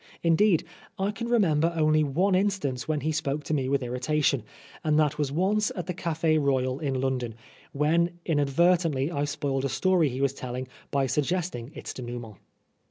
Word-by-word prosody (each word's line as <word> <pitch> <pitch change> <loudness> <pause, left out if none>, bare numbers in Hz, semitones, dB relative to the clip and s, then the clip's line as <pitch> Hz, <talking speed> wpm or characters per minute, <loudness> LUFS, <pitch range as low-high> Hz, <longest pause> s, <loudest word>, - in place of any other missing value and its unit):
Indeed, 170 +1 +4 0.3
I 195 +2 0
can 235 +2 -5
remember 170 -9 +3
only 155 -1 +3
one 175 +8 +1
instance 185 -10 0
when 155 -2 0
he 160 - 0
spoke 145 -1 -2
to 155 - -3
me 135 -3 0
with 140 -1 +1
irritation, 130 +2 0 0.4
and 155 -2 +2
that 150 -1 +1
was 145 -2 0
once 195 +6 +1
at 180 - -4
the 180 - -3
Cafe 160 -2 +1
Royal 130 -2 +1
in 135 -4 -1
London, 125 -4 -1 0.4
when 170 +4 +1
inadvert 165 +3 +3
ently 150 -3 -1
I 145 -3 0
spoiled 140 -2 -2
a 140 - 0
story 180 0 +2
he 130 +1 -5
was 135 -1 +1
telling 130 -1 -5 0.2
by 140 -1 +1
suggesting 150 -2 -1
its - - -6
denouement. 120 -4 -7
150 Hz, 175 wpm, -27 LUFS, 135-170 Hz, 0.4 s, Indeed